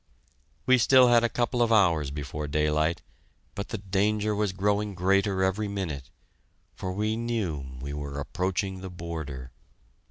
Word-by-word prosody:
We 130 0 +5
still 130 +1 +6
had 120 -1 +5
a 120 - +2
couple 120 +2 0
of 115 -1 +3
hours 85 -9 +4
before 75 +1 -5
daylight, 75 +2 +1 0.5
but 100 - -5
the 110 - -3
danger 105 +2 0
was 105 -1 0
growing 100 +2 0
greater 95 +1 +2
every 100 +3 0
minute, 85 -10 -4 0.6
for 95 - -5
we 105 +3 -1
knew 90 - -3
we 70 +2 -5
were 70 -1 -5
approaching 95 +4 -2
the 95 - -6
border. 80 -7 -6
95 Hz, 150 wpm, -27 LUFS, 75-105 Hz, 0.6 s, still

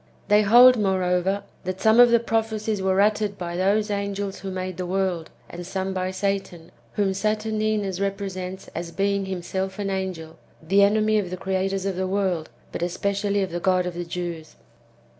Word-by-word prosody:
They 210 +1 +6
hold, 240 +4 +7
moreover, 190 0 +1 0.2
that 185 0 -4
some 220 +3 +4
of 245 0 +9
the 235 0 +5
prophecies 220 -2 -1
were 190 0 +1
uttered 210 -1 +1
by 175 -1 -5
those 205 +4 +1
angels 200 -1 -3
who 195 - -6
made 185 -1 -4
the 180 - -3
world, 185 -3 -1 0.2
and 175 +1 -8
some 190 +1 -3
by 185 0 -2
Satan; 190 -3 -3 0.2
whom 200 -2 +1
Saturn 215 +2 -1
inus 210 -3 -1
represents 195 -1 -4
as 170 +1 -5
being 200 +1 0
himself 190 +1 -3
an 200 -1 -2
angel, 185 -4 -4 0.2
the 195 +5 +2
enemy 215 +1 +3
of 190 -4 -3
the 185 - -5
creators 190 +1 -1
of 195 -2 -2
the 190 0 -1
world, 185 -4 -1 0.2
but - - -5
especially 200 +3 0
of 185 - -4
the 175 - -3
God 185 0 +2
of 180 - -3
the 175 +1 -4
Jews. 170 -2 -6
195 Hz, 180 wpm, -24 LUFS, 185-205 Hz, 0.2 s, of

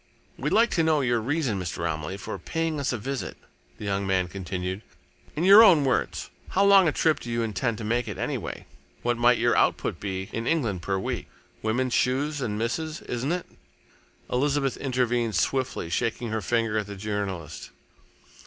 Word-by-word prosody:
"We'd - - -2
like 230 +2 +4
to 165 - +2
know 160 -2 +3
your 120 -3 +1
reason, 130 -4 -1
Mr. 85 -2 -4
Romilly, 80 +3 -3
for 100 0 -6
paying 165 - -2
us 140 - 0
a 120 - -1
visit," 135 +5 -4 0.4
the - - -7
young 100 -1 -1
man 95 -1 +1
continued, 95 +1 -4 0.5
"in 155 - -1
your 200 +4 +10
own 165 -10 +6
words. 130 - -1 0.2
How 195 +2 +3
long 195 -2 +7
a - - +3
trip 155 +1 +2
do 120 - -8
you 115 0 0
intend 115 +1 -1
to 115 - -6
make, 120 +2 0
anyway? 105 - -4 0.4
What 120 0 0
might 120 +1 +5
your - - +2
output - - +1
be 95 -1 -4
in 115 +1 -3
England 115 - 0
per 95 +3 -1
week? 95 - -3 0.3
Women's 120 +3 0
shoes 140 +3 +1
and 105 -5 -2
misses', 155 +8 -2
isn't 125 +5 -3
it?" 180 0 -2 0.9
Elizabeth 135 +1 +1
intervened 120 -4 0
swiftly, 130 -3 0
shaking 115 +2 -1
her 110 0 -1
finger 115 +1 0
at 105 - -4
the 100 - -7
journalist. 95 -7 -4
120 Hz, 180 wpm, -26 LUFS, 100-140 Hz, 0.9 s, your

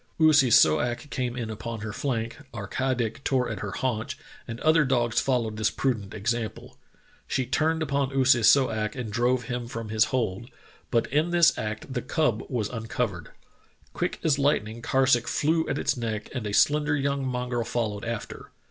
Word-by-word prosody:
Oo 155 -1 +6
si 135 -4 +5
so 80 -10 +6
ak 120 +4 -3
came 125 -3 -2
in 115 -3 -3
upon 115 +1 -6
her 105 0 -5
flank, 115 -1 -3 0.2
Ar 105 -2 -4
ka 130 +5 -1
dik 120 +2 -3
tore 130 -2 +1
at 105 - -5
her 105 - -4
haunch, 110 +1 -2 0.3
and 115 +1 -6
other 155 0 +4
dogs 120 -3 +1
followed 115 -5 0
this 110 0 +2
prudent 110 -7 -2
example. 115 +1 -3 0.5
She 130 - -1
turned 160 +5 +1
upon 140 -2 0
Oo 135 -1 +2
si 125 -2 +5
so 125 +3 +5
ak 105 -1 -2
and 120 -5 -5
drove 125 +2 +1
him 120 0 -4
from 115 -2 -6
his 110 +2 +3
hold, 120 -2 -2 0.4
but 115 -2 +2
in 155 +4 +2
this 175 -1 +5
act 110 +4 -5
the 125 - -1
cub 125 -9 0
was 120 -6 -1
uncovered. 110 -6 -3 0.6
Quick - - -2
as 145 -3 +2
lightning 115 -5 0
Karsuk 130 -2 +2
flew 160 +2 +1
at 140 - -1
its - - 0
neck 115 -3 -4
and 120 -5 -3
a - - -3
slender 150 +6 +3
yellow 140 0 -1
mongrel 125 -2 -2
followed 110 -3 -2
after. 115 -2 -6
120 Hz, 190 wpm, -26 LUFS, 110-135 Hz, 0.6 s, Oo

